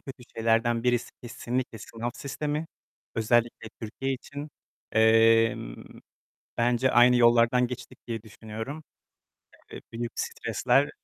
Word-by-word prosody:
kötü 135 -2 -10
şeylerden 115 +1 +2
birisi 120 -1 +1
kesinlikle 120 -1 -4
sınav 115 +4 -5
sistemi. 150 +4 -3 0.5
Özellikle 115 0 +1
Türkiye 135 +5 -3
için, 145 +3 -7 0.4
emm, 115 - +3 0.7
bence 120 +2 +2
aynı 120 +1 +6
yollardan 120 +1 +4
geçtik 125 0 -8
diye 115 -2 -4
düşünüyorum. 110 +7 -8 0.9
Eee, - - -8
büyük 115 +1 -4
stresler, 140 +2 +1
120 Hz, 105 wpm, -27 LUFS, 115-125 Hz, 0.9 s, aynı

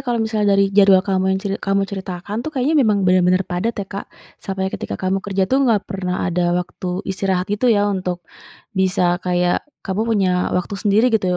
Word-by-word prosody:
kalau 240 -1 0
misal 220 -2 0
dari 195 0 +3
jadwal 195 -1 +5
kamu 190 -1 0
yang - - -4
ceri 200 -1 -2
kamu 195 0 +1
ceritakan 195 +2 -5
tuh 310 - -4
kayaknya 270 +2 0
memang 210 -5 +2
bener-bener 185 0 +3
padat 180 +7 -2
ya 200 - -3
Kak, 195 +1 -7 0.3
sampai 190 -1 -3
ketika - - -4
kamu 190 +1 -1
kerja 195 -1 -1
tuh 265 +8 +1
nggak 230 -6 +2
pernah 185 -2 -3
ada 175 -1 +1
waktu 180 +1 -4
istirahat 190 0 -1
gitu 240 +4 +1
ya 205 -3 +3
untuk 180 -2 -3 0.5
bisa 185 -2 +1
kayak 180 0 +1 0.2
kamu 195 +1 -2
punya 195 -5 +2 0.3
waktu 180 - -3
sendiri 220 +4 +3
gitu 205 -4 +2
195 Hz, 190 wpm, -20 LUFS, 185-205 Hz, 0.5 s, jadwal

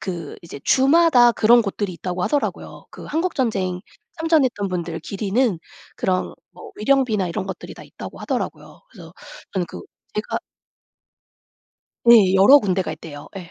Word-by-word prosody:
그 170 -5 -6
이제 165 -4 -9
주마다 270 -3 +5
그런 235 +2 +5
곳들이 200 -2 -3
있다고 180 +1 -4
하더라고요. 290 -1 -3
그 - - -11
"한국전쟁 230 - -1 0.4
참전했던 280 -11 +1
분들 170 -2 -4
기리는 205 +1 -1 0.4
그런 185 -1 -1 0.2
뭐 - - -13
위령비나 215 -5 +1
이런 190 +3 -4
것들이 190 -2 -7
다 - - -12
있다."고 - - -10
하더라고요. - - -5
그래서 - - -13 0.4
저는 180 -3 -1
그 - - -9 0.3
제가 210 - -2 1.7
네 215 -6 +7
여러 200 +10 +8
군데가 190 - -1
있대요. 150 -2 -10
예. 175 -3 -9
200 Hz, 320 characters per minute, -21 LUFS, 180-255 Hz, 1.7 s, 여러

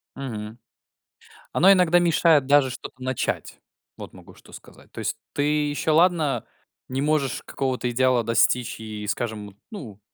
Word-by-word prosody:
Мгм. 110 -4 -7 0.9
Оно 190 +4 +6
иногда 180 -2 +5
мешает 165 -4 +3
даже 140 -1 +4
что-то 130 +1 -9
начать. 130 -1 -3 0.4
Вот - - -10
могу - - -15
что - - -19
сказать. - - -15
То - - -9
есть - - -2 0.2
ты 145 - 0 0.3
еще 145 +2 -1
ладно 160 -3 +2 0.4
не 130 +1 -3
можешь 145 -4 0
какого-то 130 -2 -2
идеала 125 0 +2
достичь 115 +1 +1
и, 105 -1 -7
скажем, 105 -3 -4
ну, 120 - -9
130 Hz, 140 wpm, -24 LUFS, 115-155 Hz, 0.9 s, Оно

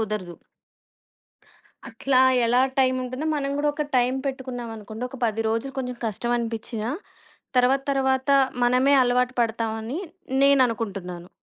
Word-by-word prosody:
కుదరదు. 210 -5 -3 1.5
అట్లా 255 +3 -1 0.3
ఎలా 240 +2 +3 0.2
టైం 260 -1 +4
ఉంటుందో 255 +5 -4
మనం 275 -1 -2
గూడా 295 0 +1
ఒక 300 0 -2
టైం 250 +1 +2
పెట్టుకున్నాం 255 -3 -5
అనుకోండొక 220 +5 -7
10 225 0 -1
రోజులు 230 +5 -2
కొంచెం 250 -1 -3
కష్టం 230 +3 -2
అనిపించినా 225 0 -4 0.7
తర్వాత, 260 +2 +3
తర్వాత 265 0 +1 0.3
మనమే 250 +3 +4
అలవాటు 250 +1 +2
పడతామని 225 +3 -2 0.4
నేననుకుంటున్నాను. 205 -10 +1
245 Hz, 115 wpm, -24 LUFS, 225-265 Hz, 1.5 s, టైం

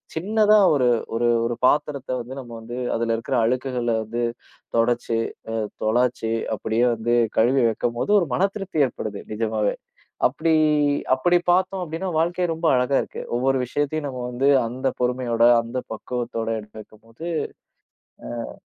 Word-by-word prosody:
சின்னதா 210 +4 +4 0.2
ஒரு 125 -3 +3 0.3
ஒரு 120 0 +2 0.2
ஒரு 120 0 -2
பாத்திரத்தை 145 -3 0
வந்து 130 +3 -8
நம்ம 120 -2 -12
வந்து 120 +2 -7 0.2
அதுல 115 0 0
இருக்குற 130 +3 -2
அழுக்குகள 125 0 -1
வந்து 115 +2 -3 0.5
தொடச்சு, 115 0 +1 0.6
துலச்சு, 115 0 +1 0.2
அப்படியே, 110 +3 0
வந்து 120 +2 0 0.2
கழுவி 125 +3 +4
வைக்கும்போது 120 - -2
ஒரு 170 - -1
மனதிருப்தி 195 -5 0
ஏற்படுது. 105 -4 -6
நிஜமாவே, 110 -1 0 0.5
அப்படி 160 +5 0 0.6
அப்படி 175 +7 +2
பாத்தோம். 185 +1 +1
அப்படின்னா, 165 +4 -4
வாழ்க்கை 175 +2 +1
ரொம்ப 165 +1 -2
அழகா 125 +2 +2
இருக்கு. - - -8 0.2
ஒவ்வொரு, 135 +2 +2
விஷயத்தையும் 145 +3 -2
நம்ம 130 -2 -5
வந்து 130 +3 +1 0.2
அந்த 130 +3 -2
பொறுமையோட 125 -2 0 0.2
அந்த 120 +2 -5
பக்குவத்தோட 115 0 -4 0.3
வைக்கும்போது 115 +8 -12 1.2
அ. - - -11
125 Hz, 130 wpm, -23 LUFS, 115-150 Hz, 1.2 s, சின்னதா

